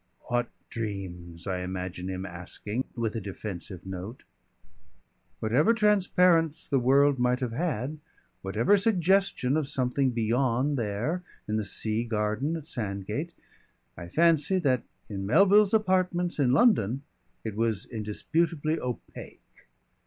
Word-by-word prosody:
_" - - -12
"What 120 0 +1 0.2
dreams?" 90 -6 -5
I 95 -2 -2
imagine 90 0 -4
him 95 0 -4
asking, 100 +7 -4
with 115 -2 -2
a 115 - -2
defensive 95 -2 -7
note. 95 +5 -7 1.2
Whatever 140 - +3
transparence 180 -6 +3
the 135 - +2
world 135 +2 +4
might 125 0 +2
have 125 -3 -2
had, 150 0 -2 0.4
whatever 110 - +3
suggestion 190 - +2
of 155 -3 0
something 135 -1 +1
beyond 125 +4 +1
there, 120 - -2 0.3
in 105 +1 0
the 110 - -1
sea 110 +2 -1
garden 110 +6 -1
at 155 -2 -10
Sandgate, 105 - -3 0.6
I 85 - -8
fancy 165 - +3
that 130 -9 +2 0.3
in 95 -2 -4
Melville's 200 - +5
apartments 185 -5 +1
in 130 -3 +3
London 135 - +3 0.4
it 110 -2 -4
was 110 -3 0
indisputably 155 +8 -1
opaque. 125 -1 -8
125 Hz, 125 wpm, -28 LUFS, 105-160 Hz, 1.2 s, Melville's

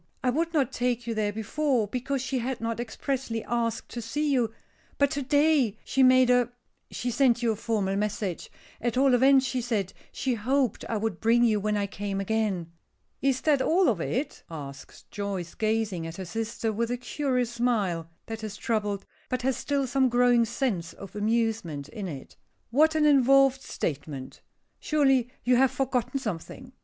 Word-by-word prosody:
I 250 - +3
would 330 +5 0
not 275 -6 +1
take 245 -2 -1
you 230 - -2
there 215 -2 0
before, 225 +2 0
because 255 +4 -2
she 260 0 -1
had 250 +1 -3
not 230 0 -3
expressly 240 -1 -3
asked 230 -1 -2
to 240 - -5
see 290 +6 -1
you. 240 -4 +1 0.5
But 280 -1 +3
to 280 - -2
day 285 -5 +3
she 270 - +1
made 255 -1 +6
a 245 -1 +3 0.4
she 245 - -3
sent 245 -2 +3
you 230 - +3
a - - -1
formal 205 -3 -1
message 200 -3 -2 0.3
at 240 0 -1
all 270 0 +4
events 265 +2 +5
she 250 0 -1
said 220 -6 -2 0.2
she 260 - -1
hoped 250 +2 0
I 225 - 0
would 210 -4 -2
bring 235 +2 +4
you 220 -3 +3
when 210 +1 0
I 200 - 0
came 200 0 -4
again." 195 -5 -1 0.5
"Is 265 -1 +1
that 290 -3 +3
all 355 +6 +3
of 200 -8 0
it?" 270 - -2
asks 140 -4 -9
Joyce, 195 -4 -4
gazing 215 -6 -1
at 165 - -8
her 190 - -5
sister 225 +3 -3
with 230 +2 -1
a 245 - -1
curious 250 -1 -1
smile, 210 -9 0 0.2
that 225 0 -6
is 210 -1 -5
troubled, 210 -3 -1 0.2
but 255 -1 -2
has 265 0 +1
still 280 -1 -1
some 260 +1 +2
growing 245 -1 +4
sense 220 -8 -2
of 195 - -11
amusement 210 -9 -1
in 195 +4 -6
it. 140 -6 -8 0.4
"What 310 +5 +4
an 310 -1 +3
involved 275 -1 +5
statement! 145 - -5 0.4
Surely 270 -5 +2
you 250 0 +4
have 265 +1 +5
forgotten 265 0 -1
something. 245 +4 -6
235 Hz, 180 wpm, -27 LUFS, 210-265 Hz, 0.5 s, made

